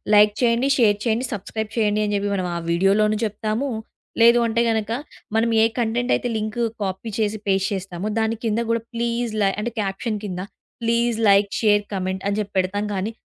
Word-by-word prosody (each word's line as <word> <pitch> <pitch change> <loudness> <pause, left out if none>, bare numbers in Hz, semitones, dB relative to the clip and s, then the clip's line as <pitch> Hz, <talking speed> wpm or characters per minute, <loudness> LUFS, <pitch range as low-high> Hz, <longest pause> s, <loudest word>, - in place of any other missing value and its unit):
like 210 0 +6
చేయండి, 240 +3 +2
share 210 -5 +4
చేయండి, 235 +3 +1
subscribe 220 +2 -4
చేయండి 215 -1 +2
అని 210 - -1
జెప్పి 200 0 -1
మనం 185 -2 -1
ఆ - - -1
వీడియోలోన 195 +5 +3
జెప్తాము, 220 +5 -2 0.5
లేదు 235 +1 +7
అంటే 235 +1 +1
గనుక, 220 -1 -1 0.5
మనం 230 +1 +2
ఏ - - +6
కంటెంట్ 240 +2 +1
అయితే 245 - -4
లింకు 215 +2 -1 0.2
కాపీ 190 +4 -4
చేసి 215 0 0
పేస్ట్ 195 0 +2
చేస్తామో, 190 +1 -4
దాని 220 0 0
కింద 220 +1 +1
గూడా, 230 -1 0
ప్లీజ్ 235 -1 -1
లై 195 - +3
అంటే 235 +1 -3
కాప్శన్ 205 +2 -3
కింద 180 -3 -4 0.4
ప్లీజ్ 235 0 +1
లైక్, 200 0 +5
షేర్, 205 -1 +4
కామెంట్ 190 0 -3
అని 200 +1 0
జెప్పి 200 -1 -8
పెడతాం 205 +3 -1
గానీ, 195 +4 -2
215 Hz, 180 wpm, -22 LUFS, 200-230 Hz, 0.5 s, లేదు